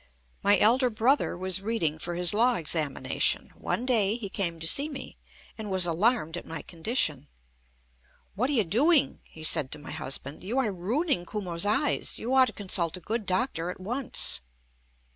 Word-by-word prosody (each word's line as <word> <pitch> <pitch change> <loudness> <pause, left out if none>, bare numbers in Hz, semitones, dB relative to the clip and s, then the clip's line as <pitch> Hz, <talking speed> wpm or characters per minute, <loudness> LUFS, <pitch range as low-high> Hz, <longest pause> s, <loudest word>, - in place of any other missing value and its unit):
My 205 0 +5
elder 250 +4 +4
brother 240 +1 +1
was 185 +1 0
reading 185 -8 -1
for 175 +1 -4
his 175 +1 +2
law 240 +3 +3
examination. 155 -4 +1
One 245 - -3
day 220 -5 +2
he 210 -5 -6
came 170 -4 -2
to 160 - -4
see 280 - +5
me, 285 - -8 0.4
and 215 -1 -5
was 185 -2 +4
alarmed 175 0 +1
at - - -8
my 160 -1 -6
condition. 160 - -2 1.1
"What 245 +7 -1
are - - +1
you 230 -6 +3
doing?" 270 - +2
he 160 - -13
said 140 -3 +1
to - - -6
my 145 0 -10
husband. 140 -1 -2
"You 220 +8 -3
are 250 -6 +1
ruining 205 - -1
Kumo's 185 -3 -2
eyes. 270 +8 0
You 245 +3 -3
ought 260 -1 +6
to - - -5
consult 185 -4 0
a - - -9
good 215 +3 -4
doctor 185 -3 -1
at 180 - -7
once." 240 +7 -2
200 Hz, 180 wpm, -27 LUFS, 170-240 Hz, 1.1 s, ought